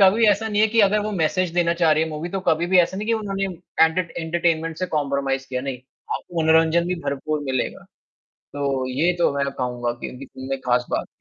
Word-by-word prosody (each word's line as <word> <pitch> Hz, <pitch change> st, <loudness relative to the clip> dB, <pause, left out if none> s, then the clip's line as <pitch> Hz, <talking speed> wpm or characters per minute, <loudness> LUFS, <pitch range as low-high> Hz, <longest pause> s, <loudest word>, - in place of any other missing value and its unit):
कभी 200 Hz, +4 st, +5 dB
ऐसा 210 Hz, +1 st, +3 dB
नहीं 210 Hz, -1 st, +1 dB
है 220 Hz, -, +6 dB
कि 225 Hz, +1 st, +3 dB
अगर 205 Hz, +1 st, +4 dB
वो 215 Hz, -, -2 dB
मैसेज 180 Hz, 0 st, +1 dB
देना 170 Hz, -1 st, +3 dB
चाह 160 Hz, -2 st, +5 dB
रही 155 Hz, +1 st, +2 dB
हैं 160 Hz, -, -1 dB
मूवी 155 Hz, +3 st, -4 dB
तो 195 Hz, +2 st, -3 dB
कभी 160 Hz, +2 st, +2 dB
भी 185 Hz, +1 st, +4 dB
ऐसा 180 Hz, +2 st, +3 dB
नहीं 210 Hz, +2 st, -4 dB
कि -, -, +3 dB
उन्होंने 195 Hz, -3 st, -2 dB, 0.4 s
एंटर 170 Hz, +1 st, 0 dB
एंटरटेनमेंट 165 Hz, -1 st, 0 dB
से 185 Hz, -, -1 dB
कॉम्प्रोमाइज़ 140 Hz, -4 st, -1 dB
किया 130 Hz, -1 st, -2 dB
नहीं, 130 Hz, -1 st, -4 dB, 0.4 s
आपको 170 Hz, -2 st, -3 dB
मनोरंजन 160 Hz, +1 st, +4 dB
भी 180 Hz, -, 0 dB
भरपूर 145 Hz, +2 st, -2 dB
मिलेगा। 130 Hz, -2 st, -2 dB, 0.7 s
तो 135 Hz, -2 st, -1 dB
ये 155 Hz, +8 st, +1 dB
तो -, -, +3 dB
मैं 140 Hz, -, +1 dB
कहूँगा 125 Hz, -2 st, -2 dB
कि -, -, -3 dB
ये 130 Hz, +2 st, -9 dB, 0.2 s
उनकी 135 Hz, +1 st, -2 dB
ख़ास 125 Hz, 0 st, +2 dB
बात। -, -, -2 dB
160 Hz, 220 wpm, -22 LUFS, 140-185 Hz, 0.7 s, है